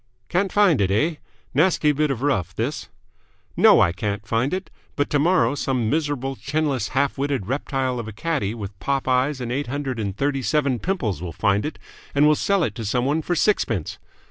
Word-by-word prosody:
"Can't 185 Hz, +1 st, +1 dB
find 195 Hz, -, +4 dB
it, 95 Hz, -, +2 dB
eh? 150 Hz, +11 st, +1 dB, 0.4 s
Nasty 155 Hz, 0 st, +3 dB
bit 150 Hz, +1 st, +1 dB
of 135 Hz, -2 st, -2 dB
rough, 130 Hz, -, 0 dB
this!" -, -, -3 dB, 0.7 s
"No, -, -, +6 dB
I 85 Hz, -, +4 dB
can't 100 Hz, +3 st, -3 dB
find 115 Hz, +5 st, 0 dB
it. 185 Hz, 0 st, -4 dB, 0.2 s
But 145 Hz, -, -1 dB
tomorrow 145 Hz, -4 st, +3 dB
some 130 Hz, -6 st, -1 dB
miserable, 145 Hz, -4 st, -1 dB
chinless, 140 Hz, -5 st, -1 dB
half 140 Hz, 0 st, +1 dB
witted 140 Hz, -7 st, -1 dB
reptile 130 Hz, 0 st, -2 dB
of 115 Hz, -, -5 dB
a -, -, -6 dB
caddie 115 Hz, -3 st, -2 dB
with 100 Hz, -3 st, -8 dB
pop 135 Hz, -1 st, -1 dB
eyes 130 Hz, +2 st, +1 dB
and 120 Hz, -2 st, -4 dB
eight 140 Hz, +2 st, -2 dB
hundred 135 Hz, -2 st, -3 dB
and 100 Hz, -2 st, -3 dB
thirty 140 Hz, -1 st, 0 dB
seven 135 Hz, 0 st, +1 dB
pimples 120 Hz, -, -2 dB
will 90 Hz, -2 st, -5 dB
find 100 Hz, -, +1 dB
it, 155 Hz, -, -7 dB, 0.4 s
and 145 Hz, +1 st, +5 dB
will 150 Hz, -, +6 dB
sell 195 Hz, +4 st, +1 dB
it -, -, -1 dB
to 115 Hz, -, -4 dB
someone 130 Hz, +8 st, 0 dB
for 175 Hz, +3 st, -1 dB
sixpence! 115 Hz, -, 0 dB
135 Hz, 195 wpm, -23 LUFS, 115-150 Hz, 0.7 s, No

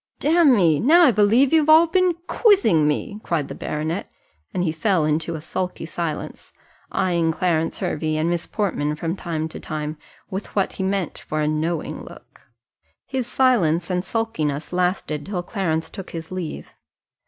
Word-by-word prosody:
"Damme, 255 Hz, -, +4 dB
now 335 Hz, +7 st, +6 dB
I 285 Hz, -, +7 dB
believe 230 Hz, +7 st, +4 dB
you've 310 Hz, -1 st, +4 dB
all 320 Hz, +2 st, +8 dB
been 365 Hz, +1 st, +2 dB
quizzing 385 Hz, -, +4 dB
me," 205 Hz, -, -2 dB
cried 160 Hz, -5 st, -1 dB
the -, -, -5 dB
baronet, 155 Hz, +5 st, -3 dB, 0.4 s
and 180 Hz, -, -1 dB
he 165 Hz, -, +1 dB
fell 165 Hz, 0 st, +1 dB
into 155 Hz, +2 st, -1 dB
a 155 Hz, -, -6 dB
sulky 180 Hz, +2 st, -4 dB
silence, 160 Hz, -1 st, -5 dB, 0.4 s
eyeing 170 Hz, -3 st, +1 dB
Clarence 165 Hz, -1 st, 0 dB
Hervey 155 Hz, 0 st, -2 dB
and 155 Hz, +1 st, 0 dB
Miss 170 Hz, 0 st, -1 dB
Portman 150 Hz, -8 st, -1 dB
from 165 Hz, +3 st, -3 dB
time 160 Hz, -4 st, -3 dB
to -, -, -8 dB
time 155 Hz, -1 st, -5 dB, 0.3 s
with 195 Hz, +2 st, -6 dB
what 195 Hz, -2 st, +1 dB
he -, -, -6 dB
meant 190 Hz, -2 st, -2 dB
for 155 Hz, -, -4 dB
a 150 Hz, -, +1 dB
knowing 155 Hz, +2 st, -2 dB
look. -, -, -15 dB, 0.6 s
His 260 Hz, -3 st, -3 dB
silence 185 Hz, -11 st, +2 dB
and 180 Hz, 0 st, 0 dB
sulkiness 165 Hz, -12 st, -2 dB
lasted 180 Hz, -4 st, -1 dB
till 185 Hz, -3 st, -3 dB
Clarence 170 Hz, -6 st, -2 dB
took 195 Hz, -, -8 dB
his 165 Hz, 0 st, -7 dB
leave. 185 Hz, -4 st, -6 dB
175 Hz, 165 wpm, -22 LUFS, 155-215 Hz, 0.6 s, all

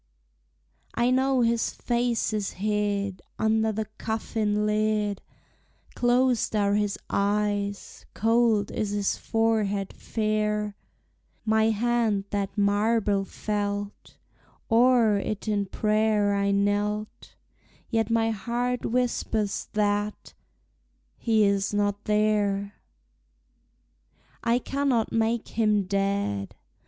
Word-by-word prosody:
I 240 Hz, +1 st, +2 dB
know 260 Hz, 0 st, +2 dB
his 230 Hz, 0 st, +2 dB
face 240 Hz, -2 st, -1 dB
is 210 Hz, -2 st, -2 dB
hid 200 Hz, -1 st, -1 dB, 0.2 s
Under 220 Hz, 0 st, +2 dB
the 220 Hz, +1 st, -3 dB
coffin 215 Hz, -1 st, -1 dB
lid; 210 Hz, -1 st, 0 dB, 0.7 s
Closed 245 Hz, -1 st, +2 dB
are 200 Hz, -1 st, +2 dB
his 205 Hz, -1 st, 0 dB
eyes; 205 Hz, 0 st, -1 dB
cold 225 Hz, -2 st, +2 dB
is 210 Hz, -, -2 dB
his 205 Hz, -1 st, 0 dB
forehead 215 Hz, -3 st, 0 dB
fair; 210 Hz, -1 st, -1 dB, 0.7 s
My 220 Hz, 0 st, +3 dB
hand 225 Hz, -2 st, +1 dB
that 200 Hz, 0 st, -2 dB
marble 205 Hz, 0 st, +2 dB
felt; 205 Hz, 0 st, -4 dB, 0.5 s
O'er 230 Hz, -3 st, +4 dB
it 210 Hz, +2 st, -4 dB
in 205 Hz, -2 st, 0 dB
prayer 215 Hz, 0 st, +1 dB
I 200 Hz, 0 st, +1 dB
knelt; 205 Hz, +1 st, -1 dB, 0.6 s
Yet 225 Hz, -1 st, +1 dB
my 225 Hz, 0 st, +2 dB
heart 240 Hz, +4 st, -2 dB
whispers 225 Hz, -4 st, -1 dB
that 205 Hz, 0 st, -1 dB, 0.8 s
he 220 Hz, -2 st, +2 dB
is 200 Hz, 0 st, +1 dB
not 205 Hz, 0 st, 0 dB
there! 210 Hz, -1 st, +1 dB, 1.7 s
I 235 Hz, 0 st, +3 dB
cannot 265 Hz, -3 st, 0 dB
make 225 Hz, 0 st, 0 dB
him 215 Hz, -3 st, +2 dB
dead! 195 Hz, -, -1 dB
210 Hz, 100 wpm, -26 LUFS, 205-225 Hz, 1.7 s, O'er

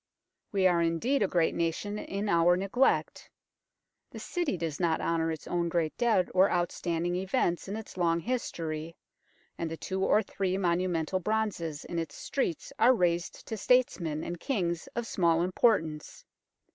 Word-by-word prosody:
We 195 Hz, -2 st, +1 dB
are 175 Hz, -2 st, +4 dB
indeed 170 Hz, +12 st, +1 dB
a 200 Hz, -, +3 dB
great 170 Hz, -3 st, +1 dB
nation 170 Hz, +5 st, -2 dB
in 200 Hz, +1 st, -4 dB
our 170 Hz, -1 st, +4 dB
neglect. 200 Hz, +8 st, +1 dB, 0.8 s
The -, -, -10 dB
City 345 Hz, -, -2 dB
does 160 Hz, -3 st, -3 dB
not 170 Hz, -3 st, +1 dB
honour 165 Hz, -1 st, 0 dB
its 160 Hz, -, -6 dB
own 170 Hz, -1 st, -1 dB
great 165 Hz, -2 st, 0 dB
dead 225 Hz, -7 st, +2 dB
or 190 Hz, +2 st, +5 dB
outstanding 175 Hz, 0 st, -1 dB
events 185 Hz, -2 st, 0 dB
in 200 Hz, -, -4 dB
its 220 Hz, -3 st, -8 dB
long 170 Hz, -2 st, +2 dB
history, 165 Hz, -8 st, -3 dB, 0.6 s
and 165 Hz, -, -2 dB
the 165 Hz, -, -5 dB
two 190 Hz, +3 st, -3 dB
or 215 Hz, +3 st, +4 dB
three 190 Hz, -1 st, -2 dB
monumental 175 Hz, -1 st, 0 dB
bronzes 190 Hz, -7 st, -2 dB
in 170 Hz, -, -3 dB
its 165 Hz, -, -5 dB
streets 220 Hz, -, -3 dB
are 245 Hz, +3 st, +6 dB
raised 175 Hz, -3 st, -1 dB
to 220 Hz, -, -4 dB
statesmen 180 Hz, -10 st, +1 dB
and 175 Hz, -1 st, -5 dB
kings 175 Hz, -10 st, -2 dB
of 235 Hz, -, -2 dB
small 170 Hz, -5 st, +2 dB
importance. 180 Hz, -5 st, 0 dB
175 Hz, 160 wpm, -29 LUFS, 165-200 Hz, 0.8 s, are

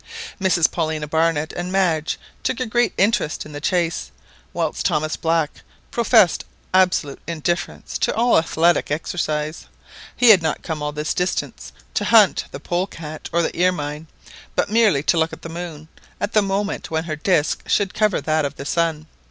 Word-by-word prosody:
Mrs 180 Hz, -4 st, +3 dB
Paulina 155 Hz, -2 st, -2 dB
Barnett 160 Hz, 0 st, +1 dB
and 175 Hz, +1 st, -4 dB
Madge 170 Hz, -5 st, +1 dB, 0.2 s
took 260 Hz, -, -1 dB
a 255 Hz, -, 0 dB
great 240 Hz, -2 st, +1 dB
interest 200 Hz, -6 st, +1 dB
in 150 Hz, -, -10 dB
the 145 Hz, 0 st, -7 dB
chase, 170 Hz, -, 0 dB, 0.4 s
whilst -, -, -2 dB
Thomas 155 Hz, +1 st, 0 dB
Black 165 Hz, -2 st, -1 dB, 0.3 s
professed 225 Hz, -6 st, +4 dB, 0.3 s
absolute 180 Hz, -6 st, +2 dB
indifference 170 Hz, +1 st, -3 dB
to -, -, +1 dB
all 235 Hz, -2 st, +4 dB
athletic 165 Hz, +1 st, +2 dB
exercise. 155 Hz, 0 st, -2 dB, 0.5 s
He 245 Hz, -, +5 dB
had 200 Hz, -5 st, +8 dB
not 160 Hz, -1 st, -2 dB
come 155 Hz, -2 st, -4 dB
all 150 Hz, 0 st, -2 dB
this 150 Hz, +1 st, -2 dB
distance 180 Hz, -1 st, -3 dB, 0.2 s
to -, -, 0 dB
hunt 220 Hz, -4 st, +5 dB
the -, -, -8 dB
polecat 170 Hz, -2 st, -4 dB
or 170 Hz, 0 st, +2 dB
the -, -, -1 dB
ermine, 150 Hz, -3 st, -1 dB, 0.5 s
but -, -, 0 dB
merely 215 Hz, -11 st, +3 dB
to 170 Hz, -, +2 dB
look 160 Hz, 0 st, 0 dB
at -, -, -10 dB
the 165 Hz, -, -6 dB
moon 165 Hz, -2 st, -7 dB, 0.3 s
at 205 Hz, +2 st, -2 dB
the 215 Hz, -, +5 dB
moment 200 Hz, +1 st, -2 dB
when 160 Hz, 0 st, -1 dB
her 160 Hz, -2 st, -4 dB
disc 155 Hz, -1 st, +1 dB
should 195 Hz, -3 st, +1 dB
cover 215 Hz, -3 st, +2 dB
that 155 Hz, 0 st, +1 dB
of 140 Hz, 0 st, -3 dB
the 140 Hz, -, -8 dB
sun. 160 Hz, -1 st, 0 dB
165 Hz, 170 wpm, -21 LUFS, 155-190 Hz, 0.5 s, had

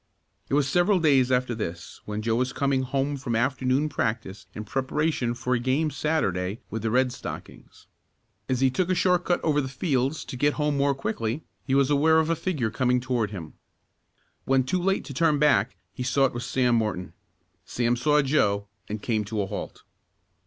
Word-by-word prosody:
It -, -, +1 dB
was 145 Hz, -2 st, +2 dB
several 180 Hz, +6 st, +3 dB
days 135 Hz, -6 st, +3 dB
after 125 Hz, -1 st, +1 dB
this 90 Hz, -6 st, -6 dB
when 105 Hz, 0 st, -4 dB
Joe 115 Hz, 0 st, +1 dB
was 125 Hz, +1 st, 0 dB
coming 140 Hz, -1 st, +1 dB
home 135 Hz, +2 st, -1 dB
from 125 Hz, -4 st, -3 dB
afternoon 130 Hz, +3 st, +1 dB
practice 110 Hz, -9 st, -3 dB
in 110 Hz, -, -5 dB
preparation 130 Hz, +1 st, -1 dB
for 125 Hz, +1 st, -1 dB
a 125 Hz, -, +2 dB
game 135 Hz, +6 st, +1 dB
Saturday 100 Hz, -, -1 dB
with 110 Hz, -, -3 dB
the 115 Hz, -, -1 dB
Red 125 Hz, +2 st, +2 dB
Stockings. -, -, -9 dB, 0.6 s
As 130 Hz, -1 st, 0 dB
he 135 Hz, -1 st, +4 dB
took 180 Hz, +7 st, 0 dB
a 185 Hz, -, +2 dB
short 180 Hz, 0 st, +2 dB
cut 175 Hz, -, +2 dB
over 150 Hz, -2 st, +2 dB
the 130 Hz, -, -3 dB
fields 135 Hz, +1 st, -1 dB
to -, -, -7 dB
get 145 Hz, +3 st, +1 dB
home 150 Hz, -1 st, 0 dB
more 140 Hz, 0 st, +2 dB
quickly, 115 Hz, +1 st, -3 dB, 0.2 s
he 135 Hz, -, +2 dB
was 140 Hz, +1 st, +3 dB
aware 155 Hz, +3 st, +4 dB
of 160 Hz, +1 st, +2 dB
a -, -, +2 dB
figure 150 Hz, -, -2 dB
coming 125 Hz, +2 st, +2 dB
toward 125 Hz, -4 st, -1 dB
him. 85 Hz, -7 st, -8 dB, 0.9 s
When 135 Hz, -1 st, +3 dB
too 180 Hz, +8 st, -1 dB
late 195 Hz, +2 st, 0 dB
to 140 Hz, -, -7 dB
turn 155 Hz, +1 st, +2 dB
back 140 Hz, -8 st, +3 dB, 0.2 s
he -, -, -7 dB
saw 130 Hz, +2 st, +2 dB
it 130 Hz, -, -1 dB
was 120 Hz, +1 st, -5 dB
Sam 125 Hz, -2 st, +2 dB
Morton. 105 Hz, -6 st, -1 dB, 0.5 s
Sam 120 Hz, 0 st, 0 dB
saw 150 Hz, +4 st, +3 dB
Joe 105 Hz, -8 st, +1 dB, 0.2 s
and 105 Hz, 0 st, -5 dB
came 110 Hz, -3 st, 0 dB
to 105 Hz, 0 st, -2 dB
a -, -, -2 dB
halt. 100 Hz, +1 st, -7 dB
130 Hz, 195 wpm, -26 LUFS, 115-145 Hz, 0.9 s, he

